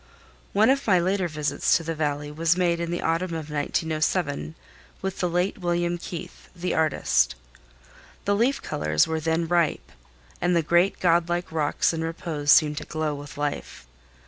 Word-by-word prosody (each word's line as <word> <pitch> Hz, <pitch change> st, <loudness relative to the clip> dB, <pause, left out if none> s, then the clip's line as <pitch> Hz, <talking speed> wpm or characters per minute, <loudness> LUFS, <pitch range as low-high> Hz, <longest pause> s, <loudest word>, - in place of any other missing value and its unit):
One 215 Hz, +5 st, +4 dB
of 275 Hz, -2 st, 0 dB
my 190 Hz, -3 st, +5 dB
later 185 Hz, +1 st, +1 dB
visits 155 Hz, -1 st, +1 dB
to 170 Hz, -, -7 dB
the 165 Hz, 0 st, -3 dB
Valley 150 Hz, -1 st, -2 dB
was 165 Hz, +3 st, +1 dB
made 170 Hz, -2 st, +1 dB
in 170 Hz, 0 st, -2 dB
the 175 Hz, -, -3 dB
autumn 165 Hz, +1 st, 0 dB
of 155 Hz, -2 st, -6 dB
1907 155 Hz, +1 st, -1 dB, 0.4 s
with 190 Hz, 0 st, -4 dB
the 180 Hz, -, +1 dB
late 180 Hz, +4 st, 0 dB
William 175 Hz, -1 st, 0 dB
Keith, 170 Hz, -1 st, -8 dB
the 180 Hz, +1 st, -2 dB
artist. 65 Hz, -, +2 dB, 0.9 s
The 200 Hz, -, +2 dB
leaf 245 Hz, +6 st, +1 dB
colors 75 Hz, 0 st, +1 dB
were 160 Hz, 0 st, -2 dB
then 165 Hz, +1 st, 0 dB
ripe, 170 Hz, -2 st, 0 dB, 0.5 s
and 175 Hz, 0 st, +2 dB
the 170 Hz, -, +2 dB
great 175 Hz, +4 st, +2 dB
godlike 175 Hz, 0 st, +1 dB
rocks 155 Hz, +1 st, +1 dB
in 160 Hz, 0 st, -2 dB
repose 165 Hz, -3 st, -1 dB
seemed 150 Hz, -2 st, +5 dB
to -, -, -9 dB
glow 155 Hz, -1 st, -2 dB
with 145 Hz, 0 st, -9 dB
life. 145 Hz, -, -4 dB
165 Hz, 170 wpm, -25 LUFS, 150-175 Hz, 0.9 s, my